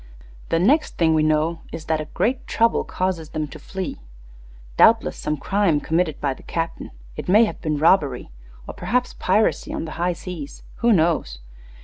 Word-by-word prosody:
The 165 Hz, -, +2 dB
next 265 Hz, -, +2 dB
thing 165 Hz, -2 st, +3 dB
we 155 Hz, -, +3 dB
know 155 Hz, +2 st, +1 dB
is 160 Hz, -, -7 dB
that 160 Hz, -1 st, 0 dB
a -, -, -5 dB
'great 245 Hz, -, -1 dB
trouble' 230 Hz, 0 st, +2 dB
causes 180 Hz, -4 st, -2 dB
them 155 Hz, -1 st, -3 dB
to -, -, -10 dB
flee 190 Hz, -1 st, -5 dB, 0.8 s
doubtless -, -, +5 dB
some 150 Hz, 0 st, -3 dB
crime 185 Hz, 0 st, +1 dB
committed 160 Hz, 0 st, 0 dB
by 140 Hz, -2 st, 0 dB
the -, -, -16 dB
captain. 165 Hz, 0 st, -4 dB, 0.3 s
It -, -, -6 dB
may 215 Hz, +5 st, +6 dB
have -, -, -6 dB
been 155 Hz, -3 st, -1 dB
robbery, 145 Hz, -, +2 dB, 0.4 s
or -, -, -6 dB
perhaps 245 Hz, +8 st, -1 dB
piracy 210 Hz, +4 st, +1 dB
on -, -, -3 dB
the 160 Hz, -, -7 dB
high 175 Hz, 0 st, +1 dB
seas; 170 Hz, -4 st, -8 dB
who 235 Hz, 0 st, +3 dB
knows? 160 Hz, -, +2 dB
165 Hz, 175 wpm, -22 LUFS, 155-190 Hz, 0.8 s, may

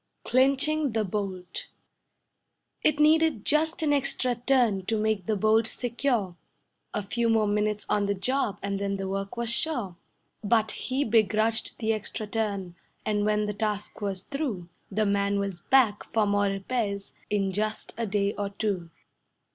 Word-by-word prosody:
CLINCHING 275 Hz, +2 st, +2 dB
THE 220 Hz, -1 st, +1 dB
BOLT 185 Hz, -2 st, -4 dB, 1.1 s
It 305 Hz, -1 st, +2 dB
needed 310 Hz, -6 st, +4 dB
just 315 Hz, +2 st, +1 dB
an 295 Hz, -2 st, +3 dB
extra 275 Hz, -3 st, +1 dB
turn 240 Hz, -5 st, +2 dB
to 225 Hz, -, +1 dB
make 215 Hz, -3 st, 0 dB
the 215 Hz, -, +2 dB
bolt 220 Hz, +2 st, +3 dB
secure, 235 Hz, -6 st, -1 dB, 0.6 s
A 210 Hz, -, -2 dB
few 230 Hz, +4 st, 0 dB
more 220 Hz, -1 st, +4 dB
minutes 210 Hz, 0 st, 0 dB
on 205 Hz, -1 st, +1 dB
the 200 Hz, -, +1 dB
job 250 Hz, +2 st, 0 dB
and 200 Hz, 0 st, -1 dB
then 200 Hz, 0 st, -1 dB
the 195 Hz, 0 st, -3 dB
work 195 Hz, +3 st, -4 dB
was 235 Hz, -1 st, -1 dB
sure; 235 Hz, -, -1 dB, 0.5 s
But 220 Hz, 0 st, +2 dB
he 260 Hz, +2 st, -1 dB
begrudged 220 Hz, -1 st, +1 dB
the 225 Hz, -1 st, +1 dB
extra 215 Hz, 0 st, -4 dB
turn, 205 Hz, -4 st, -2 dB, 0.3 s
and 210 Hz, -1 st, +1 dB
when 210 Hz, 0 st, +2 dB
the 210 Hz, -, -2 dB
task 210 Hz, 0 st, -3 dB
was 195 Hz, -2 st, -3 dB
through, 245 Hz, -, -3 dB, 0.2 s
The 215 Hz, +2 st, +1 dB
man 200 Hz, 0 st, +1 dB
was 200 Hz, -3 st, -2 dB
back 240 Hz, -6 st, +4 dB
for 220 Hz, -2 st, +3 dB
more 205 Hz, 0 st, +2 dB
repairs 200 Hz, 0 st, -2 dB, 0.2 s
in 195 Hz, -2 st, +1 dB
just 215 Hz, +3 st, -3 dB
a 230 Hz, 0 st, -2 dB
day 200 Hz, 0 st, +1 dB
or 205 Hz, -1 st, -3 dB
two. 200 Hz, -4 st, -2 dB
215 Hz, 160 wpm, -27 LUFS, 200-240 Hz, 1.1 s, needed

